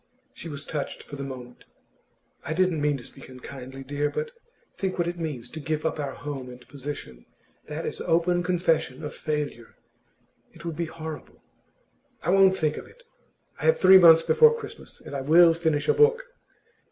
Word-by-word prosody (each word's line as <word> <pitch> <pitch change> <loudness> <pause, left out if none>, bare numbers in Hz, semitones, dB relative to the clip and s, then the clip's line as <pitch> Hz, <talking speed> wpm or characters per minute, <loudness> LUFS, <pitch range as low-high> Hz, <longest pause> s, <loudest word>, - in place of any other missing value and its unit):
She 170 - -8
was 145 -1 -7
touched 150 -3 -5
for 145 - -10
the 140 - -6
moment. 125 -2 -9 0.8
'I - - -3
didn't 180 -4 +1
mean 145 -1 +1
to 125 - -11
speak 135 - -11
unkindly, 130 +1 -9
dear. 145 +2 -1
But 465 - -4 0.4
think 190 -1 -3
what 175 -1 0
it 175 0 -4
means, 150 -8 -5
to 160 - -7
give 155 0 -3
up 160 - -1
our 140 -2 -3
home 140 -3 -6
and 125 0 -13
position. 135 - -8 0.4
That - - -5
is - - -5
open 175 +2 +2
confession 165 -6 0
of 150 - -5
failure. 150 -6 -4 0.8
It - - -13
would 165 -2 -4
be 170 +2 -2
horrible.' 160 -1 -9 0.8
'I 175 - +1
won't 190 0 +5
think 155 -1 0
of - - -8
it. - - -20 0.6
I - - -4
have 480 - +4
three 190 0 +8
months 165 -2 +8
before 465 - +5
Christmas, 455 - -10
and - - -9
I 135 - -2
will 165 +4 +6
finish 160 -3 -1
a - - +5
book! 465 +2 +4
155 Hz, 185 wpm, -26 LUFS, 140-175 Hz, 0.8 s, three